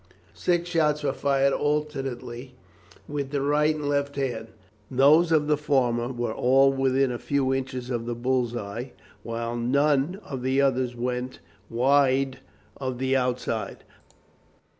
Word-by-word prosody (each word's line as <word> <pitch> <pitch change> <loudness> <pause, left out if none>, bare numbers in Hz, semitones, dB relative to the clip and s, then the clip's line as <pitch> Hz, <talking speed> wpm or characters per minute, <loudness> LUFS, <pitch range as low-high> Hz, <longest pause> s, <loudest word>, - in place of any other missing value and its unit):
Six 175 -1 0
shots 150 -3 +1
were 140 -2 0
fired 140 -1 +2
alternately 135 -4 -3 0.5
with 145 -2 -3
the 140 0 -1
right 150 +2 +2
and 150 -2 -4
left 140 0 0
hand. 120 -5 -3 0.4
Those 150 +6 +5
of 155 -2 +3
the 150 0 +2
former 125 -5 +1
were 120 -3 -3
all 135 +3 +4
within 135 0 +2
a 120 - -4
few 135 -2 0
inches 130 -1 -4
of 120 -1 -3
the 120 - -2
bull's 125 0 0
eye, 120 +4 -6 0.3
while 115 0 -4
none 140 +7 +1
of 135 -3 -6
the 130 +2 +1
others 130 -3 +1
went 125 +1 -3 0.3
wide 135 +1 +2 0.4
of 130 -2 -4
the 130 +1 0
outside. 125 -1 -2
135 Hz, 140 wpm, -26 LUFS, 125-145 Hz, 0.5 s, Those